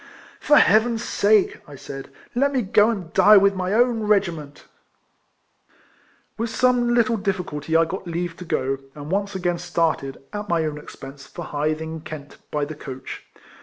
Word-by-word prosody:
" - - -21
For 295 - +4
Heaven's 225 +2 +4
sake," 210 -2 +2
I 145 - -11
said, 135 0 -8
" - - -27
let 280 +3 +2
me 260 -3 0
go 205 +2 +4
and 185 -8 -4
die 210 0 +7
with 200 0 +5
ray 185 0 -2
own 235 +1 +3
regiment! 165 -8 0 0.8
" - - -35
With 230 0 -1
some 240 0 +2
little 235 -1 +3
difficulty 180 -6 -1
I 165 - +4
got 185 +2 -6
leave 170 0 -3
to 180 - -9
go, 135 -4 -1 0.2
and 150 +1 -8
once 200 0 -1
again 175 -2 -1
started, 165 -6 -1 0.2
at 210 0 -5
my 165 -2 +1
own 150 -1 -4
ex - - -12
pense, 135 +1 -11
for 170 - -8
Hythe, 155 +2 -1
in 160 0 -6
Kent, 150 -2 -9
by 150 -1 -1
the 155 - -7
coach. 130 -3 -8
175 Hz, 185 wpm, -23 LUFS, 150-210 Hz, 0.8 s, die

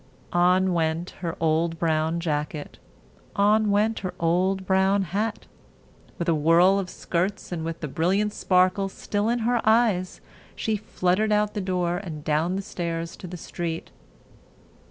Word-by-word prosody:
On 180 +1 +3
went 165 +1 -1
her 170 -2 -3
old 165 +1 +1
brown 160 0 0
jacket; 150 -2 -3 0.6
on 210 +1 +3
went 210 +2 +2
her 185 -2 -5
old 185 +3 +1
brown 190 +1 +3
hat. 205 +5 -2 0.7
With 170 - -3
a 165 - +4
whirl 170 +5 +4
of 185 -2 -4
skirts 185 +3 -2
and 165 -2 -3
with 165 0 -5
the 150 - -3
brilliant 190 +8 0
sparkle 185 +1 +2
still 205 +2 -2
in 240 0 0
her 240 -1 +2
eyes, 220 -5 +2 0.4
she 220 - -1
fluttered 205 +1 0
out 210 0 +2
the 210 - -2
door 180 -2 -1
and 165 -6 -7
down 155 +4 +1
the 195 - -3
stairs 170 -4 -4
to 185 - -8
the 180 +1 -7
street. 165 -1 -5
180 Hz, 155 wpm, -25 LUFS, 165-200 Hz, 0.7 s, a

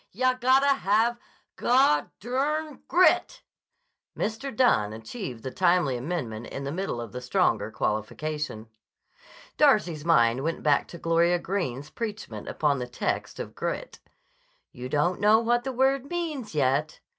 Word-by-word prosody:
Yah 255 +5 +2
gotta 260 +3 +4
have 225 +4 +2 0.4
gu—grit." 275 - +1 0.7
Mr. 225 +4 -3
Dunne 110 - +3
achieved 115 - -7
the 130 - -4
timely 175 -6 +2
amendment 120 -5 -4
in 140 - -6
the 140 - -3
middle 180 -6 -3
of 115 -3 -6
the 125 - -6
stronger 110 -4 +1
qualification. 110 +3 -3 0.9
Darcy's 210 - +3
mind 125 -7 +3
went 165 +1 -2
back 145 -2 +3
to 170 - -10
Gloria 170 +1 +2
Greene's 155 -7 -3
preachment 210 - -6
upon 145 -3 0
the 125 - -4
text 120 - -3
of - - -6
"grit": - - -4 0.7
"You 125 +1 -7
don't 175 +7 0
know 210 +1 +6
what 240 +1 +1
the 265 - -2
word 265 +2 +1
means, 310 - -4
yet." 145 +2 +1
175 Hz, 135 wpm, -26 LUFS, -, 0.9 s, know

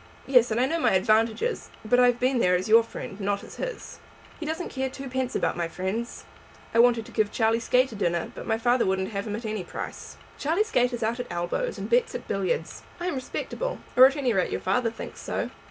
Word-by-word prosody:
"Yes, 250 -3 +5
and 220 +1 0
I 255 - +4
know 330 +5 -1
my - - +3
advantages. 220 - +1 0.2
But 245 +3 +3
I 250 - +7
have 245 -1 +2
been 255 0 +2
there 180 -5 +4
as 185 +3 -1
your 225 +1 +7
friend, 215 -3 -8
not 200 0 -1
as - - -11
his." - - -6 0.4
"He 315 - -5
doesn't 320 +3 -3
care 265 0 -2
twopence 260 -1 -4
about - - 0
my 170 -1 -1
friends. 190 +7 -4 0.5
I 230 - +3
wanted 235 -2 +5
to - - -12
give 215 -2 +1
Charlie 225 0 +2
Skate 250 +2 +2
a - - -8
dinner, 175 -4 -1
but - - -8
my 220 -1 +1
father 240 +2 +2
wouldn't 190 +1 0
have 200 0 -3
him 210 - -2
at 225 +2 -6
any 215 -3 -3
price." - - -7 0.2
"Charlie 330 +8 +2
Skate 250 - +1
is 240 -1 -3
out 230 +3 -1
at 245 - -4
elbows, 175 - -2
and - - -4
bets 485 0 +2
at - - -6
billiards. 185 -5 -2 0.2
I 350 - -4
am 360 - 0
respectable, - - -4 0.2
or 255 +1 +10
at 275 - -2
any 265 -5 +1
rate 190 -3 +1
your - - -1
father 230 +5 +1
thinks 225 - -9
so. - - -3
235 Hz, 235 wpm, -26 LUFS, 205-260 Hz, 0.5 s, or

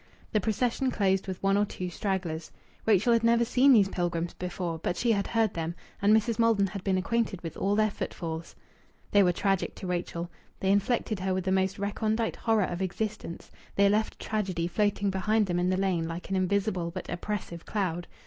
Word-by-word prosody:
The 215 - +2
procession 240 +5 0
closed 195 -5 +1
with 190 0 -5
one 195 0 +3
or 205 - +3
two 185 -2 -5
stragglers. 175 -4 -3 0.4
Rachel 220 +2 +4
had 230 0 +2
never 235 0 +4
seen 255 +4 +5
these 210 -6 +6
pilgrims 175 -2 -2
before, 175 -2 -4
but 175 - -2
she 240 - +2
had 200 -3 +1
heard 225 -3 +1
them; 165 0 -3 0.3
and 200 +1 +4
Mrs. 220 +1 +3
Maldon 225 -3 +4
had 195 0 -5
been 190 -2 +1
acquainted 215 0 0
with 165 - -5
all 200 +1 +1
their 215 0 +3
footfalls. 165 -4 -5 0.6
They 205 - +6
were 180 -2 +5
tragic 195 +1 0
to - - -8
Rachel; 175 -1 -3 0.3
they 190 - +2
infected 205 +1 +1
her 185 0 0
with 185 - -1
the 190 - -1
most 190 0 +1
recondite 215 +3 -1
horror 225 -3 +2
of 175 0 -3
existence; 200 -1 -4 0.2
they 200 0 +5
left 215 +2 0
tragedy 190 -6 -1
floating 205 +1 +1
behind 210 +3 +2
them 175 -2 -1
in 180 +1 +1
the 185 - +1
lane 185 -4 0
like 170 +3 -6
an - - +1
invisible 190 -1 0
but 180 +1 -6
oppressive 175 -2 -4
cloud. 175 -4 -2
195 Hz, 195 wpm, -28 LUFS, 180-215 Hz, 0.6 s, these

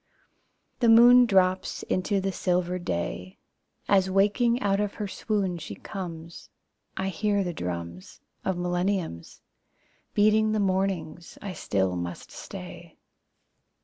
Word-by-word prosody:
The 235 - +3
moon 240 +2 +8
drops 185 -2 +1
into 195 +2 0
the 195 0 -1
silver 180 -1 -1
day 90 - -4 0.5
As 190 -2 +3
waking 210 +5 +2
out 200 -4 +1
of 210 -1 -2
her 210 - -4
swoon 195 -3 -2
she 160 - -7
comes. 170 -4 -8 0.5
I 190 0 -1
hear 200 +2 0
the 175 -2 -3
drums 85 - -6 0.2
Of 190 -2 -1
millenniums 175 - -2 0.7
Beating 215 +1 +4
the 215 - +1
mornings 185 -4 -2
I 200 -2 -6
still 95 - -1
must 85 0 -6
stay. - - -10
190 Hz, 120 wpm, -26 LUFS, 170-205 Hz, 0.7 s, moon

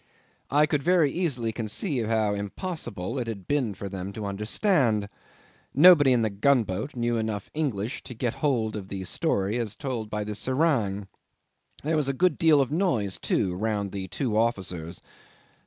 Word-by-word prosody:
I 150 +2 +4
could 150 -1 0
very 170 -3 +3
easily 130 -10 -1
conceive 115 - -2
how 110 -2 +1
impossible 115 - -4
it 120 - -3
had 100 -5 -6
been 130 -8 0
for 100 - -6
them 95 0 -5
to 105 0 -5
understand. 105 - +1 0.7
Nobody 150 -2 +8
in 120 -2 +3
the 110 - 0
gunboat 110 +1 +1
knew 120 -1 0
enough 110 -3 -3
English 130 -6 -2
to 125 - -8
get 120 0 -1
hold 115 -7 +1
of 100 -3 -6
the 95 -1 -5
story 100 +4 0
as 110 -3 -3
told 125 -6 -4
by 105 0 -2
the 105 0 -4
serang. 115 -6 0 0.8
There 155 +2 +1
was 145 -3 +1
a - - +1
good 180 +6 +2
deal 160 -4 +5
of 135 - -1
noise, 150 - 0
too, 95 -3 0
round 100 0 -2
the 95 -2 -4
two 115 +3 -2
officers. 95 -7 -1
115 Hz, 170 wpm, -26 LUFS, 100-140 Hz, 0.8 s, Nobody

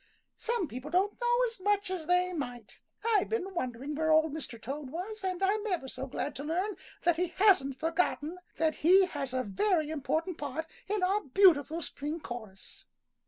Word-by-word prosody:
"Some 470 -7 0
people 255 +2 -7
don't 385 +7 +1
know 480 0 +3
as 460 -3 -5
much 405 0 +1
as 350 -4 -4
they 360 +1 +3
might. 245 -8 -6 0.3
I've 430 -5 +3
been 390 -4 -2
wondering 265 -3 -3
where 315 +1 +1
Old 315 -1 +4
Mr. 280 -7 -6
Toad 275 +4 -5
was, 385 +7 -5
and 375 0 -1
I'm 415 +3 +1
ever 355 -9 -1
so 265 +1 -5
glad 275 - -3
to 280 - -5
learn 365 +7 -1 0.3
that 345 -2 +3
he 360 +1 +1
hasn't 340 -8 +3
forgotten 325 +1 0 0.2
that 315 -1 +1
he 370 +4 +6
has 285 -7 -4
a 255 0 0
very 310 - +1
important 315 +4 -1
part 290 +2 -3 0.2
in 410 -1 0
our 390 +3 +2
beautiful 320 0 +4
spring 295 +4 -4
chorus." 220 -9 -9
330 Hz, 180 wpm, -31 LUFS, 285-385 Hz, 0.3 s, he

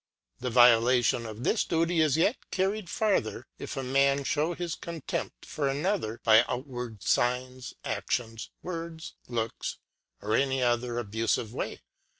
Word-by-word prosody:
The 125 - -2
Violation 120 0 +5
of 110 +2 -7
this 220 - +2
Duty 165 0 +1
is 155 -2 +3
yet 205 +9 +1
carried 195 0 -1
vi. - - -4
farther, 190 - 0
if - - -6
a 135 - -2
Man 140 +2 +2
fliew 155 +5 0
his 175 -2 -3
Contempt 165 -3 -5
of - - -11
another 145 - 0
Avd - - -9
a - - -20
by 110 +1 +6
outward 125 -5 -5
Signs, 125 +2 0
Anions, 115 -2 -2
Words, 165 -2 -6
Looks, 115 -2 -3 0.5
v^'^^^l/^ - - -9
or 110 - +3
any 135 -1 +1
other 120 0 +1
abufive 115 -1 -1
way. - - -4
130 Hz, 155 wpm, -29 LUFS, 120-160 Hz, 0.5 s, by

